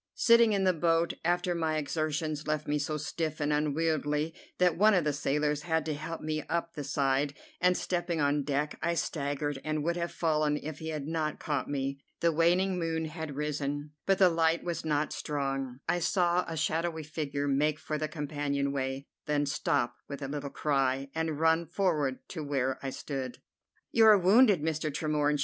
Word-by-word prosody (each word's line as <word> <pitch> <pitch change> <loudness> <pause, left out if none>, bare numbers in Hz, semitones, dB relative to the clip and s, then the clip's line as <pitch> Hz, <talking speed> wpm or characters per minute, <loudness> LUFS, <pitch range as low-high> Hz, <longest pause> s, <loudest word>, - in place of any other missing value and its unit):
Sitting 235 -1 +6
in 195 -1 +1
the 185 -1 +4
boat 165 0 +2
after 175 +1 +1
my 160 -2 0
exertions 155 +1 -2
left 155 0 -1
me 150 0 +1
so 150 +1 -2
stiff 155 0 -3
and 150 0 +1
unwieldy 150 +1 0 0.2
that 180 -2 +3
one 210 +3 +5
of 180 - +3
the 150 -1 +1
sailors 150 +1 0
had 160 -1 0
to 155 - -1
help 155 +3 -5
me 155 0 -2
up 170 0 -1
the 145 - -5
side, 140 +1 0 0.2
and, 180 0 +3
stepping 175 -2 -1
on 145 0 +2
deck, 145 +1 -2
I 170 +1 0
staggered, 145 -3 -2
and 155 -1 -1
would 170 +2 0
have 170 0 -2
fallen 155 -2 +1
if 155 0 -6
he 160 - -5
had 150 -3 -3
not 155 -1 -2
caught 145 -2 -2
me. 140 -1 -2 0.2
The 170 - +3
waning 180 +3 +2
moon 165 -1 -1
had 160 -2 -6
risen, 145 0 -3 0.2
but 195 -1 +4
the 185 -1 +6
light 165 0 +2
was 170 -2 -3
not 150 -1 0
strong. 135 -3 -3
I 175 - +1
saw 175 0 +2
a 165 - -4
shadowy 160 +1 -1
figure 145 -2 -3
make 145 +2 +2
for 155 -1 -4
the 155 - -1
companion 145 -2 -2
way, 135 0 -3 0.2
then 145 -1 +1
stop 140 -3 0
with 140 0 -6
a - - -2
little 145 0 -4
cry, 135 -2 0
and 160 -2 -2
run 160 +1 +3
forward 155 -7 0
to 160 -4 -5
where 135 -2 -1
I 135 - -3
stood. 130 -2 -5 0.5
"You 225 -1 +6
are 215 -1 +9
wounded, 200 - +5
Mr. 155 -1 -1
Tremorne!" 150 0 +1
155 Hz, 190 wpm, -30 LUFS, 145-165 Hz, 0.5 s, are